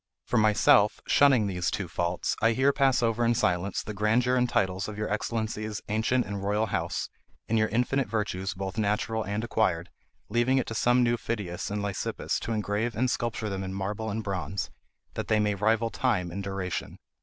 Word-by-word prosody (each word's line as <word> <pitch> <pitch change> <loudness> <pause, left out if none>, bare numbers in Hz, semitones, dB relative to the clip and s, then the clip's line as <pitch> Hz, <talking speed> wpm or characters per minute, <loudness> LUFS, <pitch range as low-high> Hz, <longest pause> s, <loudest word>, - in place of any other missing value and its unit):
For - - 0
myself, 105 -1 +4
shunning 135 -6 +5
these 90 -3 -1
two 95 - -3
faults, 85 +1 -1
I 115 +1 +4
here 135 +4 +3
pass 135 -3 +3
over 115 +1 +1
in 120 0 +3
silence 90 -3 0
the 105 - -6
grandeur 115 +5 +2
and 125 -1 +2
titles 95 -2 0
of 105 -1 -7
your 105 - -2
excellency's 110 -1 -2
ancient 110 +3 +1
and 100 0 -5
royal 105 +2 +1
house, 95 -5 -2 0.4
and 115 - 0
your 110 -1 +3
infinite 125 +4 0
virtues 100 -4 -2
both 95 +2 -4
natural 110 +2 0
and 105 +2 -3
acquired, 105 -7 0 0.4
leaving 120 +4 +2
it 130 - +1
to - - -5
some 120 +2 +3
new 120 0 +2
Phidias 100 -7 -4
and 105 0 -2
Lysippus 100 -2 -2
to 115 - -5
engrave 110 +1 -1
and 125 +4 +1
sculpture 115 -2 -2
them 95 -1 -3
in 95 0 -5
marble 105 +3 -3
and 110 +2 -3
bronze, 95 -2 -3 0.4
that - - -4
they 110 -1 +3
may 105 -1 +2
rival 110 +3 +1
time 100 -9 0
in 100 +3 -4
duration. 95 -2 -4
105 Hz, 190 wpm, -28 LUFS, 100-115 Hz, 0.4 s, shunning